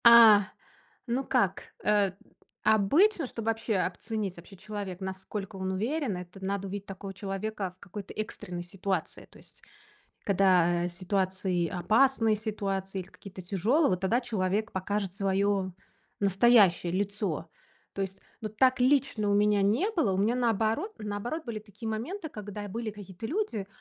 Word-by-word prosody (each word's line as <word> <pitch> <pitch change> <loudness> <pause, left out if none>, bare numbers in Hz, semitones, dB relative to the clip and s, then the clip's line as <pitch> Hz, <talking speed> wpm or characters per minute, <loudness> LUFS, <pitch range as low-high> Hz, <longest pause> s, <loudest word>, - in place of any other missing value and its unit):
А, 225 -4 +9 0.6
ну 245 +3 0
как, - - +1 0.2
э, 205 -3 +3 0.5
обычно, 280 - +4
чтобы 230 -2 -6
вообще 225 -1 -1
оценить 200 +1 -2
вообще 175 +3 -13
человека, 200 -2 -6
насколько 190 +1 -5
он 190 0 -2
уверен, 230 - -1
это 180 +2 -10
надо 195 0 -2
увидеть 200 +1 -6
такого 195 0 -7
человека 195 0 -4
в - - -46
какой-то 200 +1 -8
экстренной 200 -5 -5
ситуации. 190 -1 -3
То - - -17
есть, - - -17 0.6
когда 180 -3 +3
ситуации 185 -1 -1
опасные, 225 +5 +3
ситуации 195 -3 -3
или 180 - -12
какие-то 190 -1 -11
тяжёлые, 215 - +2
вот 180 - 0
тогда 220 +6 +2
человек 215 -2 -1
покажет 195 0 -2
своё 195 -1 +1 0.5
настоящее 195 -3 +5
лицо. 195 -4 -2 0.5
То 195 - -3
есть 195 0 -6 0.2
вот 215 -1 -6
так 255 +1 +4
лично 255 -5 +2
у - - +3
меня 205 0 +4
не 230 - +2
было. 320 - +1
У - - -1
меня 215 +5 +2
наоборот 230 - +1
наоборот 215 +10 -4
были 230 -3 -4
такие 215 +1 -8
моменты, 315 - -4
когда 205 -3 -7
были 225 +2 -4
какие-то 200 0 -9
люди, 300 - -2
205 Hz, 145 wpm, -29 LUFS, 190-225 Hz, 0.6 s, А